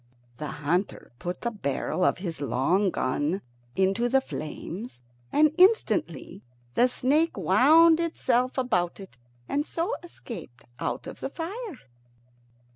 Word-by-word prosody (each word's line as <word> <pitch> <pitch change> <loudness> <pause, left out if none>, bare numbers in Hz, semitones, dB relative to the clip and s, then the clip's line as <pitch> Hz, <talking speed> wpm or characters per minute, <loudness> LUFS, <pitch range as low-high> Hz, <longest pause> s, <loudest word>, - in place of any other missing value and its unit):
The 150 - -4 0.2
hunter 175 +6 -1
put 175 0 -4
the 235 - -1
barrel 180 - -2
of - - +3
his 175 -5 -5
long 170 +9 +2
gun 150 +4 -1 0.3
into 195 +6 +2
the 270 +2 +4
flames, 185 - -7 0.3
and 305 0 +4
instantly 380 - +2 0.3
the 245 - +4
snake 290 +6 +1
wound 320 +4 +6
itself 255 -7 0
about 195 -10 0
it, 190 -11 -12 0.3
and 290 - 0
so 340 +8 -2
escaped 230 - -10 0.2
out - - -3
of - - -8
the - - -3
fire. 370 - -6
240 Hz, 125 wpm, -27 LUFS, -, 0.3 s, wound